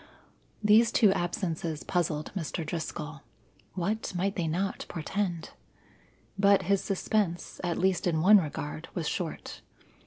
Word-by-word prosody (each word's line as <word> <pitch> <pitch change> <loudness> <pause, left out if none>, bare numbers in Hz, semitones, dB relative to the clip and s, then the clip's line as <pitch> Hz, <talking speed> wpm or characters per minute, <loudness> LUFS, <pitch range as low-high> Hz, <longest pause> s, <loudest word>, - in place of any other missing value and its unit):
These 215 +2 +6
two 205 -4 +5
absences 170 -3 -2
puzzled 165 -4 -1
Mr. 165 -2 -3
Driscoll. 155 -3 -5 0.5
What 200 +2 -2
might 195 +3 0
they 175 -4 -1
not 185 +5 -2
portend? 175 0 -3 0.9
But 200 -1 +5
his 195 +2 +1
suspense, 195 -2 -1
at 175 -2 -1
least 185 0 +1
in 160 -2 +1
one 200 +5 +7
regard, 80 - -5
was - - -2
short. - - -4
175 Hz, 125 wpm, -29 LUFS, 160-200 Hz, 0.9 s, one